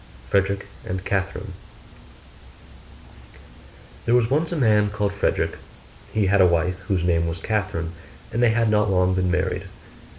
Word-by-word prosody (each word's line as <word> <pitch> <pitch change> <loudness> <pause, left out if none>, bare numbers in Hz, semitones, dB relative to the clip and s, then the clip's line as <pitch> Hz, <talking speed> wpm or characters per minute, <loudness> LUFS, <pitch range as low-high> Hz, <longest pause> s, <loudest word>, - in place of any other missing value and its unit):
FREDERICK 100 +3 0 0.2
AND 95 +1 -5
CATHERINE 95 -1 -2 2.5
There 115 - +3
was 120 0 +2
once 155 +4 +1
a - - -1
man 105 -7 +3
called 100 0 -1
Frederick: 100 - -1 0.5
he 110 -2 +1
had 100 +1 +4
a 90 - +7
wife 90 +2 +1
whose 95 -4 0
name 85 -1 +2
was 85 0 -4
Catherine, 95 -5 -2 0.4
and 115 - 0
they 120 - +5
had 115 -1 +2
not 105 -1 +3
long 90 -1 +2
been 90 0 0
married. 95 - -1
100 Hz, 145 wpm, -23 LUFS, 90-110 Hz, 2.5 s, a